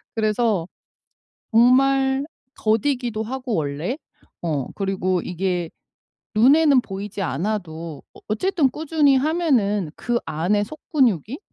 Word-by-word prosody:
그래서 215 -5 +1 0.8
정말 265 +3 +4 0.3
더디기도 225 0 0
하고 255 0 -3
원래 155 - -2 0.5
어 150 -6 -1
그리고 190 -2 0
이게 180 -1 -2 0.7
눈에는 275 +3 +5
보이지 200 0 -6
않아도 165 -2 -3
어 - - -16
어쨌든 300 - +1
꾸준히 305 -3 +2
하면은 260 - +1
그 240 -1 -1
안에 175 +7 0
속 300 +8 -11
근육이 245 - +2
215 Hz, 235 characters per minute, -22 LUFS, 185-265 Hz, 0.8 s, 눈에는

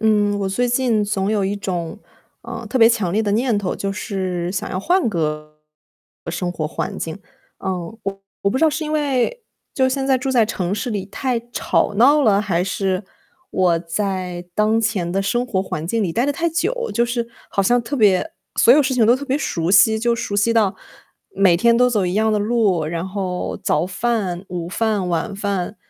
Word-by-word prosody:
嗯， 210 -2 +2
我 195 - -1
最 245 +6 0
近 240 -4 +1
总 200 -1 -1
有 210 -2 +1
一 195 +1 -1
种， 180 -3 -4 0.4
呃， 230 - -7
特 260 +4 0
别 225 -1 +8
强 210 -7 0
烈 215 +3 +1
的 205 - -1
念 235 +1 +1
头， 200 -3 -2
就 195 0 -2
是 185 -4 -3
想 190 - -3
要 185 - -2
换 350 - +2
个 150 -4 -3 0.7
生 175 +1 -2
活 160 -3 -3
环 155 - -4
境。 165 +3 -5 0.4
呃， 190 - -3 0.3
我 195 -1 -4 0.2
我 200 - +2
不 260 - 0
知 320 - +3
道 315 - +4
是 310 +1 -3
因 305 - -3
为 295 - 0 0.3
就 260 -1 +3
现 270 +1 -1
在 265 -1 +4
住 265 +2 -2
在 240 -4 +3
城 190 -3 -2
市 210 +4 -3
里 205 -3 -2
太 245 +4 -2
吵 210 - 0
闹 280 +8 +5
了， 205 -5 +4
还 180 -4 0
是 190 0 -1 0.5
我 180 -3 +2
在 180 0 -3
当 215 +1 +2
前 210 -6 -1
的 195 +2 0
生 240 +5 0
活 190 -6 0
环 160 -4 -5
境 225 +5 0
里 175 - -1
待 235 - +1
得 285 - +1
太 335 +4 0
久， 455 +9 -1
就 235 - +2
是 235 -1 -2 0.2
好 195 - +1
像 245 +5 +3
特 235 +5 -5
别 205 -6 +3 0.2
所 240 - +6
有 295 - +5
事 265 -1 0
情 230 -3 +3
都 235 - +6
特 270 +3 -4
别 275 0 0
熟 170 - -1
悉， 220 +3 +6
就 235 +1 +1
熟 205 - -4
悉 205 +3 +2
到， 210 -3 +3 0.6
每 185 -3 +4
天 235 +5 +4
都 250 +1 +4
走 210 -5 +1
一 180 - -2
样 220 +1 +2
的 210 - +2
路， 205 -6 +1
然 165 +3 -3
后 185 -2 -3
早 190 -2 +1
饭、 190 -3 -2
午 175 -2 -4
饭、 210 -2 0
晚 170 +4 -1
饭。 200 -1 -3
205 Hz, 225 characters per minute, -20 LUFS, 185-240 Hz, 0.7 s, 别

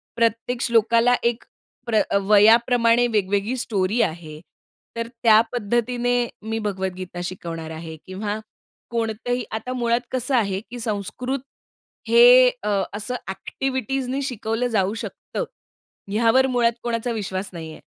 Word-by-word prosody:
प्रत्येक 230 +1 0
श्लोकाला 235 +1 +4
एक 235 0 0 0.4
प्र 220 -2 +3 0.2
वयाप्रमाणे 230 +3 +5
वेगवेगळी 205 +1 0
स्टोरी 215 -1 0
आहे. 160 -2 -3 0.6
तर 230 0 -3
त्या 230 -2 +4
पद्धतीने 240 +2 0 0.3
मी 225 +1 -3
भगवद्गीता 190 -3 -4
शिकवणार 165 -3 -6
आहे 160 0 -7
किंवा 205 +3 -4 0.5
कोणतंही 235 +2 -2
आता 220 +3 -4
मुळात 235 -1 +1
कसं 255 +1 0
आहे, 200 -5 +1
कि 245 - -6
संस्कृत 230 +5 -3 0.7
हे - - +8
अ, 200 -2 +1
असं 215 +5 -3
ॲक्टिव्हिटीजनी 260 +5 -3
शिकवलं 245 -2 -2
जाऊ 205 -3 +1
शकतं. 230 - -5 0.7
ह्यावर 235 +5 +4
मुळात 240 -2 +2
कोणाचा 235 0 -2
विश्वास 195 -3 -3
नाहीये. 160 -2 -8
230 Hz, 115 wpm, -23 LUFS, 200-245 Hz, 0.7 s, हे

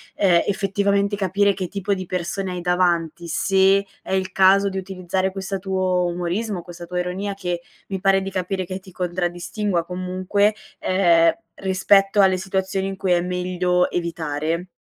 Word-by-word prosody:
ehm, 175 -4 +4
effettivamente 200 +1 +1
capire 200 +1 +2
che 185 -1 -4
tipo 200 +1 -2
di 185 -1 -4
persone 185 +2 -3
hai 180 - -4
davanti, 175 -1 0
se 190 +3 +3 0.2
è - - -5
il 190 0 0
caso 195 +1 +5
di 190 - -5
utilizzare 190 0 -2
questa 195 0 -3
tuo 185 -1 0
umorismo, 180 +3 -2
questa 175 0 -10
tua 180 +1 -3
ironia, 190 +3 -3
che 180 -3 -3 0.3
mi 190 -1 -3
pare 195 0 +3
di 195 0 -5
capire 185 0 -2
che 185 +1 -5
ti 185 -1 -16
contraddistingua 175 +1 -2
comunque, 185 +4 0 0.2
ehm, 170 -3 +4 0.3
rispetto 195 +1 +3
alle 190 -1 +4
situazioni 190 0 -2
in 195 - -4
cui 190 -1 -1
è 175 - +4
meglio 180 0 0
evitare? 165 0 -2
185 Hz, 160 wpm, -22 LUFS, 180-195 Hz, 0.3 s, caso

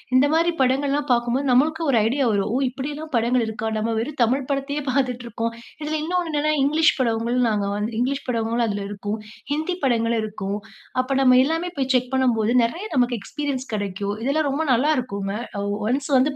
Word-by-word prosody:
இந்த 260 +2 +6
மாதிரி 335 +2 +3
படங்கள்ல்லாம் 280 +3 +1
பார்க்கும்போது, 240 +3 +1
நம்மளுக்கு 310 +6 +3
ஒரு 240 - +3
ஐடியா 270 +3 +1
வரும். 200 0 0
ஓ! - - +3
இப்டில்லாம் 290 +4 -6
படங்கள் 235 +1 +2
இருக்கா? 220 0 -3
நாம் 215 +1 -1
வெறும் 275 +4 -4
தமிழ் 255 +3 +1
படத்தயே 280 +1 -1
பார்த்துட்டுருக்கோம். 245 -3 -1 0.3
இதுல 305 +1 -2
இன்னொன்னு 355 +1 -1
என்னன்னா 300 +1 +1
இங்கிலீஷ் 310 +3 +4
படங்களும் 235 0 +1
நாங்க 205 -2 0
வந்து 210 +3 -2
இங்கிலீஷ் 270 +3 -1
படங்களும் 230 -1 0
அதுல 205 -1 -2
இருக்கும். 205 +1 -4 0.4
ஹிந்தி 315 +5 -1
படங்களும் 230 -2 +1
இருக்கும். 205 -1 -4 0.4
அப்ப 265 +1 -1
நம்ம 255 -1 +6
எல்லாமே 330 +3 -1
போய் 265 -1 0
செக் 250 +1 +1
பண்ணும்போது, 235 -4 +2
நெறைய 335 - -2
நமக்கு 245 -1 +2
எக்ஸ்பீரியன்ஸ் 275 0 -4
கெடைக்கும். 200 0 -2
இதெல்லாம் 285 +3 +1
ரொம்ப 290 +4 0
நல்லா 275 +6 +3
இருக்குங்க. 200 -5 -4 0.4
ஒ - - -1 0.2
ஒன்ஸ் 275 +3 -1
வந்து 260 +3 +3
255 Hz, 175 wpm, -23 LUFS, 230-285 Hz, 0.4 s, இந்த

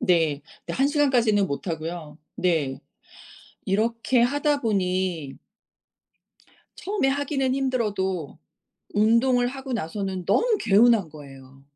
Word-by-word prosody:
네. 160 -5 +1 0.2
근데 - - -4
1 270 - +3
시간까지는 245 -9 +2
못하고요. 160 -1 -5 0.2
네. 155 -7 0 0.9
이렇게 230 +5 +1
하다 285 +3 +1
보니 185 - -1 1.4
처음에 395 -8 -1
하기는 270 -1 0
힘들어도 205 - -2 0.6
운동을 235 +4 +3
하고 265 0 -7
나서는 190 -2 -3
너무 470 -2 +2
개운한 215 -2 +4
거예요. 135 -2 -14
205 Hz, 235 characters per minute, -24 LUFS, 165-260 Hz, 1.4 s, 개운한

